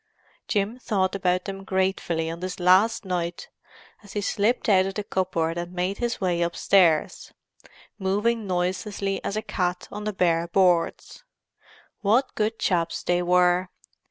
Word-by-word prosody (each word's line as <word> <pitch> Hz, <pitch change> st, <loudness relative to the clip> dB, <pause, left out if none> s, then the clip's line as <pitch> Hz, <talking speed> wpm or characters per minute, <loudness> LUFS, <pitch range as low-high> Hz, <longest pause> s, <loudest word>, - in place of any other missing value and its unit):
Jim 210 Hz, +4 st, -1 dB
thought 190 Hz, -6 st, 0 dB
about 185 Hz, -2 st, 0 dB
them 195 Hz, 0 st, -6 dB
gratefully 190 Hz, -4 st, -1 dB
on 165 Hz, +1 st, -5 dB
this 185 Hz, +1 st, -5 dB
last 195 Hz, +5 st, +4 dB
night 175 Hz, -2 st, -3 dB, 0.5 s
as 205 Hz, -2 st, -13 dB
he 210 Hz, -, -1 dB
slipped 215 Hz, +4 st, 0 dB
out 190 Hz, -3 st, +4 dB
of 195 Hz, -, -5 dB
the 210 Hz, -, -2 dB
cupboard 175 Hz, -4 st, -1 dB
and 175 Hz, +1 st, -6 dB
made 180 Hz, +2 st, -2 dB
his 240 Hz, -1 st, -2 dB
way 180 Hz, -3 st, 0 dB
upstairs, 170 Hz, -1 st, +2 dB, 0.7 s
moving 210 Hz, +3 st, 0 dB
noiselessly 185 Hz, +2 st, -2 dB
as 200 Hz, -, -3 dB
a 215 Hz, -, -2 dB
cat 180 Hz, -4 st, -2 dB
on 210 Hz, 0 st, -6 dB
the 215 Hz, -, -1 dB
bare 170 Hz, -3 st, +1 dB
boards. 180 Hz, -, +1 dB, 0.8 s
What 230 Hz, +6 st, +2 dB
good 220 Hz, +1 st, -1 dB
chaps 170 Hz, -3 st, 0 dB
they 175 Hz, 0 st, +1 dB
were! 180 Hz, +1 st, +3 dB
185 Hz, 150 wpm, -25 LUFS, 175-205 Hz, 0.8 s, last